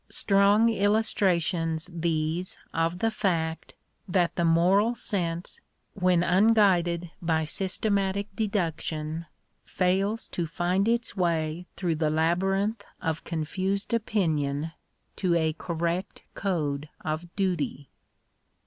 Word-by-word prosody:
Strong 200 +3 +4
illustrations 185 -6 +1
these 165 +1 -1 0.2
of 165 +2 0
the 225 +4 +1
fact, 170 -7 -1 0.3
that 180 -2 +1
the 170 - 0
moral 185 +8 +4
sense, 175 -5 -3 0.3
when 180 -3 +2
unguided 180 -3 +3
by 160 -2 +1
systematic 195 +3 0
deduction, 165 -6 -2 0.4
fails 195 +4 0
to 170 -2 -3
find 180 +5 0
its 235 -1 0
way 170 -2 -1
through 175 -3 0
the 155 -1 0
labyrinth 195 +7 +1 0.2
of 160 -1 -2
confused 190 +6 -2
opinion, 160 -9 0 0.4
to 180 -3 +1
a 160 -2 +2
correct 170 +3 -3
code 150 -6 -2
of 155 +2 -3
duty. 175 -7 -1
175 Hz, 105 wpm, -27 LUFS, 165-195 Hz, 0.4 s, Strong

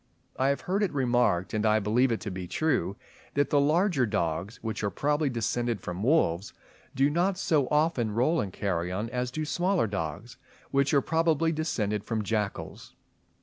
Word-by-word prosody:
I 130 - +1
have 140 0 +1
heard 195 +3 -1
it 205 - +1
remarked, 120 -9 +1
and 105 -1 0
I 110 -1 +4
believe 115 +5 +2
it 115 - 0
to 105 - -4
be 90 -1 -5
true, 100 - 0 0.4
that 145 0 +1
the 145 - +4
larger 155 - +2
dogs, 95 0 -2
which 110 -2 -3
are 100 - +1
probably 150 +5 0
descended 120 -1 -1
from 90 +1 -5
wolves, 105 - +1 0.4
do 135 +1 +4
not 175 +5 +1
so 145 -5 +1
often 150 -6 +2
roll 155 +8 +2
in 100 - -3
carrion 95 +3 -2
as 125 0 -1
do 155 +5 -3
smaller 180 0 +1
dogs, 100 +3 -5 0.3
which 140 0 +2
are 140 - +4
probably 165 +1 +1
descended 105 -10 -1
from 110 -2 -2
jackals. 105 -1 -3
125 Hz, 175 wpm, -28 LUFS, 105-150 Hz, 0.4 s, I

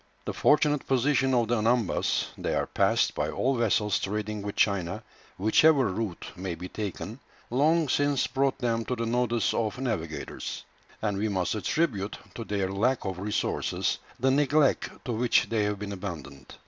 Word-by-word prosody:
The - - -3
fortunate 150 -1 +3
position 135 0 +2
of 120 -2 +2
the 120 -2 +2
Anambas 115 -1 +1
they - - -2
are - - +1
passed - - +2
by - - -1
all 135 +2 0
vessels 105 -3 +2
trading 105 +1 -3
with 100 +1 -5
China, 90 -4 +1 0.3
whichever 130 +5 +4
route 95 -2 -4
may 90 -1 -4
be 90 - -7
taken 105 +3 -5 0.3
long 155 +5 +3
since 145 0 +2
brought 135 -1 0
them 115 -2 0
to 125 - -1
the 115 -1 -2
notice 120 -1 +1
of 110 -1 -1
navigators; 105 -12 -4 0.4
and 105 -2 0
we 110 +1 0
must 95 -4 0
attribute 105 -3 -1 0.2
to 115 - -5
their 100 -3 -1
lack 120 +6 +1
of 95 -2 -3
resources 105 +2 -1 0.2
the 130 +2 +3
neglect 145 +1 +3 0.2
to 125 - -2
which 120 +1 +2
they 110 -2 +1
have 105 0 -1
been 100 0 -5
abandoned. 85 -8 -8
115 Hz, 165 wpm, -28 LUFS, 100-130 Hz, 0.4 s, whichever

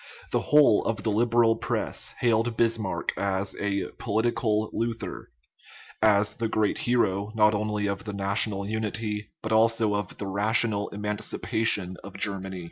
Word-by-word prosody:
The - - +2
whole 145 -8 +5
of 115 - -2
the 110 - 0
Liberal 115 +1 +3
press - - -2
hailed 115 -1 +2
Bismarck 115 -4 0
as 100 0 -1
a 100 -1 -1
" - - -32
political 110 -1 0
Luther 115 -1 -4 0.4
" - - -19 0.2
as 105 +1 0
the 115 - -2
great 110 -2 0
hero, 105 -4 +1
not 105 -1 +5
only 105 0 -1
of 100 -1 -2
the 105 - -5
national 100 0 0
unity, 105 -1 -2
but 110 - -3
also 110 -1 +3
of 105 -2 -3
the 100 - -4
rational 105 +1 +1
emancipation 105 -1 -1
of 100 0 -9
Germany. 95 -2 -3
105 Hz, 150 wpm, -26 LUFS, 100-115 Hz, 0.4 s, whole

